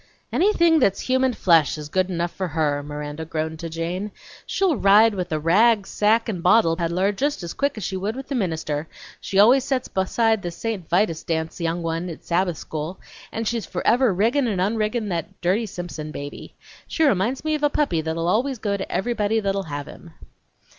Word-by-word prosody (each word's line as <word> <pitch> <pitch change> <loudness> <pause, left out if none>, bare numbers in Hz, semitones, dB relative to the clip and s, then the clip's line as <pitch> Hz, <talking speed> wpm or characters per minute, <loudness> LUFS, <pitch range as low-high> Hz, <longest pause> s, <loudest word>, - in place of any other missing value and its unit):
"Anything 340 -5 +4
that's 200 -8 +2
human 260 0 +1
flesh 165 -8 +3
is 150 -1 -7
good 185 +4 0
enough 175 -1 -2
for 190 - -3
her!" 150 -3 0
Miranda 145 +1 -6
groaned 160 0 -4
to 165 - -5
Jane. 170 +5 -3 0.4
"She'll 380 -5 +1
ride 215 +1 +5
with 180 -2 -3
the 155 - -1
rag 200 +6 +4
sack 220 +3 +2
and 190 -6 -3
bottle 175 -2 +4
peddler 175 +3 0
just 280 +2 -2
as 170 - -5
quick 280 -3 -1
as 215 - -5
she 190 - -3
would 200 +4 -2
with 270 0 -7
the - - -4
minister; 160 - -2 0.3
she 195 - -3
always 245 +6 +6
sets 265 -2 -1
beside 220 +3 +1
the 175 - -3
St. 190 0 -5
Vitus' 175 -3 +1
dance 160 +1 -3
young 170 +1 -1
one 165 +2 -2
at 165 - -9
Sabbath 175 -1 0
school; 160 +4 -5 0.3
and 225 0 -3
she's 230 -4 -2
forever 235 +6 +2
riggin' 235 +8 +2
and 200 -5 -1
onriggin' 215 +2 0
that 180 +2 -4
dirty 195 +6 +1
Simpson 175 -5 -6
baby! 145 -1 -8 0.3
She 320 - 0
reminds 250 +1 +1
me 310 - +1
of 305 - -1
a 295 - +3
puppy 280 - 0
that'll 160 +1 -2
always 250 +8 +1
go 205 -2 -1
to 190 - -6
everybody 220 0 0
that'll 195 -4 -2
have 145 0 -4
him!" 165 -2 -13
190 Hz, 195 wpm, -23 LUFS, 165-225 Hz, 0.4 s, always